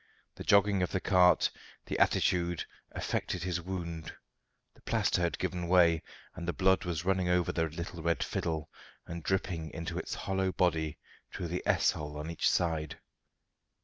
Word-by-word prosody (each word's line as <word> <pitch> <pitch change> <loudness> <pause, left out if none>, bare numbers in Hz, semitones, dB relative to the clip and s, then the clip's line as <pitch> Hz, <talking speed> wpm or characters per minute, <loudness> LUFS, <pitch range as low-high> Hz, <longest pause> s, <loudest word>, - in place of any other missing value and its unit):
The - - -8
jogging 100 -2 +4
of 90 - 0
the 95 - +2
cart, 90 -1 +4 0.3
the - - -3
attitude, 90 -2 +2 0.3
affected 90 - -2
his 90 -1 -1
wound; 85 -3 -5 0.6
the - - -23
plaster - - +1
had 85 -1 0
given 90 -2 -2
way, 85 -2 +5 0.3
and 85 -2 -7
the 85 - 0
blood 95 0 +3
was 85 -1 -2
running 95 -2 +1
over 90 -1 +2
the 80 - 0
little 85 +1 -6
red 85 -2 +1
fiddle 80 -2 -3 0.3
and 85 0 -6
dripping 85 -2 -1
into 85 +1 -4
its - - -4
hollow 95 -1 -1
body 80 -4 +1 0.3
through 85 -3 -4
the 90 +2 -2
S - - +4
hole 75 -1 -6
on 75 +2 -4
each 85 - +2
side. 80 -3 0
85 Hz, 165 wpm, -31 LUFS, 80-90 Hz, 0.6 s, way